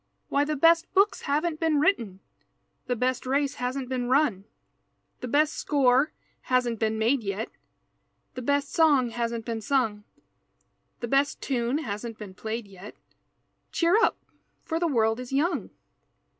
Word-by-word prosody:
Why, 285 Hz, +1 st, +2 dB
the 305 Hz, +1 st, -1 dB
best 330 Hz, +3 st, +4 dB
books 405 Hz, +2 st, +3 dB
haven't 310 Hz, +2 st, 0 dB
been 320 Hz, -3 st, +2 dB
written 230 Hz, -, +1 dB, 0.7 s
The 245 Hz, -, 0 dB
best 255 Hz, +2 st, 0 dB
race 280 Hz, +2 st, 0 dB
hasn't 255 Hz, +1 st, -2 dB
been 250 Hz, -1 st, -2 dB
run, 255 Hz, -8 st, +2 dB, 0.7 s
The 250 Hz, -, -5 dB
best 300 Hz, +5 st, +2 dB
score 275 Hz, 0 st, +2 dB, 0.4 s
hasn't 245 Hz, -3 st, +1 dB
been 220 Hz, -1 st, 0 dB
made 235 Hz, +4 st, +2 dB
yet, 200 Hz, +1 st, -4 dB, 0.8 s
The 255 Hz, -, -6 dB
best 285 Hz, +2 st, 0 dB
song 285 Hz, -7 st, +4 dB
hasn't 230 Hz, -1 st, -3 dB
been 230 Hz, -2 st, -3 dB
sung, 225 Hz, -5 st, 0 dB, 1.0 s
The 235 Hz, -, -2 dB
best 275 Hz, +4 st, +1 dB
tune 245 Hz, 0 st, -1 dB
hasn't 225 Hz, -4 st, -5 dB
been 205 Hz, -3 st, -9 dB
played 220 Hz, +3 st, -5 dB
yet, 195 Hz, +1 st, -12 dB, 0.8 s
Cheer 340 Hz, +3 st, +2 dB
up, 455 Hz, +1 st, +3 dB, 0.5 s
for 325 Hz, 0 st, -2 dB
the 340 Hz, -, +1 dB
world 225 Hz, -5 st, +1 dB
is 250 Hz, 0 st, -7 dB
young! 295 Hz, +6 st, 0 dB
255 Hz, 145 wpm, -26 LUFS, 230-290 Hz, 1.0 s, best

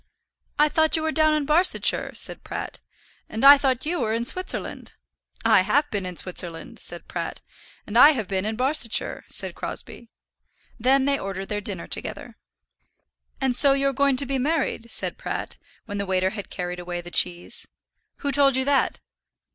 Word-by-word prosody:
"I 300 Hz, -, +5 dB
thought 315 Hz, +1 st, +2 dB
you 320 Hz, -, -1 dB
were 315 Hz, -, 0 dB
down 310 Hz, -1 st, +3 dB
in 300 Hz, -2 st, -1 dB
Barsetshire," 335 Hz, +6 st, +2 dB
said -, -, -3 dB
Pratt. -, -, -6 dB, 0.5 s
"And 225 Hz, +5 st, -1 dB
I 285 Hz, 0 st, +10 dB
thought 260 Hz, -2 st, 0 dB
you 340 Hz, +3 st, -1 dB
were 220 Hz, -3 st, -1 dB
in 235 Hz, +1 st, -2 dB
Switzerland." 370 Hz, +8 st, -2 dB, 0.5 s
"I 190 Hz, -, +6 dB
have 285 Hz, +10 st, +1 dB
been 200 Hz, -3 st, -2 dB
in 180 Hz, -, -6 dB
Switzerland," 170 Hz, 0 st, -3 dB
said -, -, -5 dB
Pratt. -, -, -5 dB, 0.4 s
"And 210 Hz, -, -8 dB
I 290 Hz, +6 st, +8 dB
have 225 Hz, -8 st, -3 dB
been 190 Hz, 0 st, -1 dB
in 215 Hz, +1 st, -2 dB
Barsetshire," 255 Hz, -1 st, +1 dB
said -, -, -3 dB
Crosbie. 235 Hz, -, -7 dB, 0.7 s
Then 265 Hz, +3 st, +3 dB
they 280 Hz, 0 st, +1 dB
ordered 195 Hz, 0 st, -6 dB
their 205 Hz, -1 st, -3 dB
dinner -, -, -5 dB
together. -, -, -4 dB, 1.0 s
"And 265 Hz, -2 st, +1 dB
so 275 Hz, +2 st, +6 dB
you're 275 Hz, 0 st, 0 dB
going 280 Hz, -1 st, +2 dB
to 280 Hz, -, +2 dB
be 270 Hz, 0 st, -2 dB
married?" 275 Hz, -5 st, -1 dB
said -, -, -2 dB
Pratt, -, -, -5 dB, 0.3 s
when 205 Hz, -2 st, -5 dB
the 200 Hz, -, -3 dB
waiter 185 Hz, 0 st, +1 dB
had 205 Hz, -2 st, -7 dB
carried 180 Hz, 0 st, -5 dB
away 175 Hz, 0 st, -5 dB
the 175 Hz, 0 st, -11 dB
cheese. 175 Hz, 0 st, -1 dB, 0.5 s
"Who 285 Hz, -, -1 dB
told 275 Hz, -1 st, +4 dB
you 260 Hz, 0 st, +1 dB
that?" 280 Hz, -1 st, +1 dB
255 Hz, 180 wpm, -24 LUFS, 195-285 Hz, 1.0 s, I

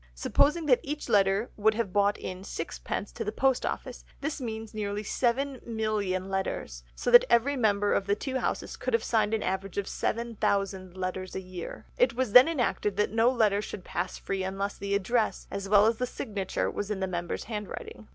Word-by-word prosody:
Supposing 300 Hz, -, +2 dB
that 255 Hz, -4 st, +5 dB
each 295 Hz, +1 st, -5 dB
letter 200 Hz, +2 st, +3 dB
would 215 Hz, +1 st, +3 dB
have 225 Hz, -5 st, -2 dB
brought 205 Hz, 0 st, +3 dB
in 185 Hz, 0 st, -6 dB
sixpence 195 Hz, +2 st, -4 dB
to -, -, -4 dB
the 210 Hz, -, -2 dB
post 265 Hz, +3 st, +1 dB
office, -, -, -5 dB, 0.2 s
this 295 Hz, 0 st, -3 dB
means 220 Hz, -2 st, -5 dB
nearly 210 Hz, -1 st, -3 dB
7,000,000 220 Hz, -6 st, -1 dB
letters, 190 Hz, -, -3 dB
so -, -, -1 dB
that 240 Hz, -, +10 dB
every 240 Hz, +5 st, +3 dB
member 205 Hz, -4 st, +2 dB
of 195 Hz, -, 0 dB
the 200 Hz, -, +3 dB
two 260 Hz, +4 st, -3 dB
Houses -, -, -2 dB
would 255 Hz, -2 st, +2 dB
have 230 Hz, -, 0 dB
signed 215 Hz, -2 st, +1 dB
an 220 Hz, -, -2 dB
average 190 Hz, 0 st, -3 dB
of 200 Hz, -, -1 dB
7000 195 Hz, -5 st, -1 dB
letters 185 Hz, 0 st, -4 dB
a -, -, -1 dB
year. 185 Hz, -2 st, -8 dB
It -, -, +4 dB
was 255 Hz, -3 st, 0 dB
then 250 Hz, +5 st, +9 dB
enacted 240 Hz, -9 st, 0 dB
that 210 Hz, -, +1 dB
no 225 Hz, +2 st, +4 dB
letter 215 Hz, -5 st, +2 dB
should 205 Hz, -2 st, -7 dB
pass 180 Hz, +1 st, -3 dB
free 195 Hz, -1 st, -3 dB
unless 195 Hz, +2 st, -2 dB
the 200 Hz, 0 st, -2 dB
address, 220 Hz, +3 st, 0 dB
as 200 Hz, 0 st, -4 dB
well 205 Hz, 0 st, +6 dB
as 225 Hz, 0 st, +2 dB
the 250 Hz, -, -1 dB
signature, 205 Hz, -7 st, -3 dB
was 205 Hz, -, -4 dB
in 210 Hz, -2 st, -2 dB
the 190 Hz, -, 0 dB
member's 175 Hz, -2 st, -3 dB
handwriting. 210 Hz, 0 st, -7 dB
210 Hz, 195 wpm, -28 LUFS, 195-235 Hz, 0.2 s, that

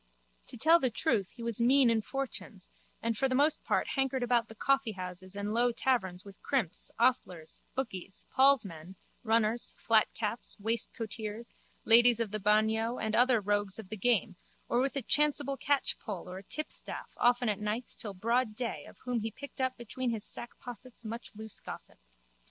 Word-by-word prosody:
To -, -, -7 dB
tell 325 Hz, +8 st, +6 dB
the 260 Hz, -, +2 dB
truth 225 Hz, -, 0 dB
he 235 Hz, -, -10 dB
was 235 Hz, -1 st, -1 dB
mean 255 Hz, 0 st, +6 dB
in 225 Hz, -1 st, +2 dB
fortunes 235 Hz, -6 st, -6 dB, 0.3 s
and 230 Hz, 0 st, 0 dB
for 270 Hz, +4 st, +1 dB
the 255 Hz, -, +1 dB
most 295 Hz, +3 st, +4 dB
part -, -, 0 dB
hankered 270 Hz, -2 st, 0 dB
about 240 Hz, -1 st, +2 dB
the 225 Hz, -, -12 dB
coffeehouses 190 Hz, -8 st, -1 dB
and 205 Hz, +1 st, -3 dB
low 240 Hz, +1 st, +3 dB
taverns 195 Hz, -8 st, 0 dB
with 200 Hz, -1 st, -13 dB
crimps, 230 Hz, -, -1 dB
ostlers, 225 Hz, -10 st, 0 dB
bookies, 195 Hz, -7 st, -4 dB
Paul's 270 Hz, -3 st, +5 dB
men, 170 Hz, 0 st, -9 dB, 0.3 s
runners, 225 Hz, 0 st, +2 dB
flatcaps, 225 Hz, 0 st, +1 dB
waistcoateers, 220 Hz, 0 st, -3 dB, 0.3 s
ladies 235 Hz, 0 st, +6 dB
of 225 Hz, -4 st, -1 dB
the 215 Hz, -, -2 dB
bagnio 220 Hz, +3 st, +2 dB
and 220 Hz, 0 st, -1 dB
other 245 Hz, -1 st, +5 dB
rogues 205 Hz, -1 st, 0 dB
of 215 Hz, -4 st, -8 dB
the 215 Hz, -, -4 dB
game 215 Hz, -3 st, +1 dB, 0.3 s
or 240 Hz, -, +1 dB
with 275 Hz, +2 st, 0 dB
a 275 Hz, -, -2 dB
chanceable 290 Hz, 0 st, +1 dB
catchpole 255 Hz, -8 st, -1 dB
or 180 Hz, +1 st, -6 dB
a -, -, -13 dB
tipstaff 310 Hz, -, -4 dB
often 245 Hz, 0 st, +3 dB
at 210 Hz, -2 st, 0 dB
nights 210 Hz, +4 st, -2 dB
till 205 Hz, -3 st, -4 dB
broad 230 Hz, +3 st, +1 dB
day 240 Hz, 0 st, -4 dB
of -, -, -14 dB
whom 250 Hz, -2 st, 0 dB
he 225 Hz, +1 st, -2 dB
picked 275 Hz, +4 st, -9 dB
up 260 Hz, 0 st, 0 dB
between 245 Hz, +2 st, -3 dB
his 225 Hz, -3 st, -3 dB
sackpossets 240 Hz, 0 st, -9 dB
much 230 Hz, 0 st, -6 dB
loose 220 Hz, 0 st, -6 dB
gossip. -, -, -8 dB
230 Hz, 175 wpm, -31 LUFS, 210-255 Hz, 0.3 s, tell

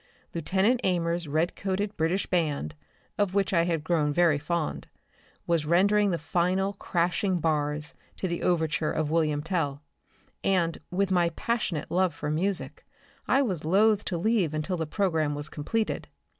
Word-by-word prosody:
Lieutenant 190 Hz, +9 st, +1 dB
Amers' 170 Hz, -2 st, 0 dB
redcoated 190 Hz, +6 st, -1 dB
British 165 Hz, +5 st, 0 dB
band, 150 Hz, -, -1 dB, 0.5 s
of 200 Hz, -2 st, +1 dB
which 195 Hz, -1 st, +1 dB
I 170 Hz, -2 st, +4 dB
had 165 Hz, -3 st, -1 dB
grown 160 Hz, -3 st, +1 dB
very 160 Hz, -1 st, +3 dB
fond, 160 Hz, +1 st, -2 dB, 0.6 s
was 165 Hz, -3 st, +1 dB
rendering 200 Hz, +5 st, +4 dB
the 170 Hz, -, 0 dB
final 185 Hz, +4 st, 0 dB
crashing 180 Hz, 0 st, 0 dB
bars 150 Hz, -1 st, -1 dB, 0.3 s
of -, -, +2 dB
the 170 Hz, -1 st, -3 dB
overture 160 Hz, -3 st, +1 dB
to 155 Hz, -, +1 dB
"Wilhelm 155 Hz, -1 st, 0 dB
Tell," 150 Hz, -5 st, -2 dB, 0.6 s
and, 175 Hz, -4 st, +1 dB
with 195 Hz, +1 st, 0 dB
my 175 Hz, -2 st, +3 dB
passionate 180 Hz, -4 st, -2 dB
love 180 Hz, -3 st, +2 dB
for 150 Hz, 0 st, -3 dB
music, 180 Hz, +4 st, -1 dB, 0.4 s
I 275 Hz, -, +4 dB
was 185 Hz, -, -2 dB
loth 205 Hz, +5 st, +3 dB
to 175 Hz, -, -2 dB
leave 180 Hz, -4 st, +1 dB
until 155 Hz, +5 st, -1 dB
the 160 Hz, -2 st, -3 dB
programme 160 Hz, -4 st, 0 dB
was 145 Hz, +1 st, -3 dB
completed. 215 Hz, +9 st, -2 dB
170 Hz, 150 wpm, -27 LUFS, 155-190 Hz, 0.6 s, I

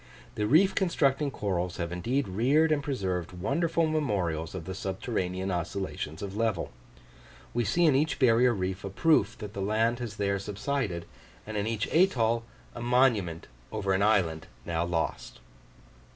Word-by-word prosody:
The 105 Hz, -3 st, -1 dB
reef 185 Hz, -, +5 dB
constructing 150 Hz, -6 st, +1 dB
corals 90 Hz, -7 st, -2 dB
have 85 Hz, -1 st, -3 dB
indeed 120 Hz, +11 st, -1 dB
reared 135 Hz, +12 st, +3 dB
and 150 Hz, -2 st, +2 dB
preserved 95 Hz, -, -2 dB
wonderful 165 Hz, -, 0 dB
memorials 95 Hz, -, -1 dB
of 85 Hz, -3 st, -6 dB
the 95 Hz, -, -5 dB
subterranean 95 Hz, -1 st, -3 dB
oscillations 90 Hz, -2 st, -4 dB
of 100 Hz, 0 st, -5 dB
level; 110 Hz, -6 st, -1 dB, 0.8 s
we 120 Hz, -, +1 dB
see 165 Hz, -, +2 dB
in 155 Hz, -, +5 dB
each 150 Hz, +4 st, +1 dB
barrier 125 Hz, -1 st, +5 dB
reef 95 Hz, -2 st, -3 dB
a 100 Hz, -, -4 dB
proof 110 Hz, -, +2 dB
that 105 Hz, -1 st, -7 dB
the 100 Hz, -, -4 dB
land 110 Hz, +4 st, +1 dB
has 115 Hz, -4 st, -5 dB
there 100 Hz, -1 st, 0 dB
subsided, 105 Hz, -3 st, -3 dB, 0.4 s
and 110 Hz, -, -6 dB
in 105 Hz, +1 st, -1 dB
each 115 Hz, -1 st, -1 dB
atoll 120 Hz, -10 st, +2 dB, 0.3 s
a 120 Hz, -, -7 dB
monument 120 Hz, -9 st, +2 dB, 0.3 s
over 100 Hz, -3 st, -1 dB
an 95 Hz, -, +1 dB
island 95 Hz, -7 st, +2 dB, 0.2 s
now 85 Hz, 0 st, -1 dB
lost. 85 Hz, -7 st, -3 dB
105 Hz, 155 wpm, -28 LUFS, 95-130 Hz, 0.8 s, reef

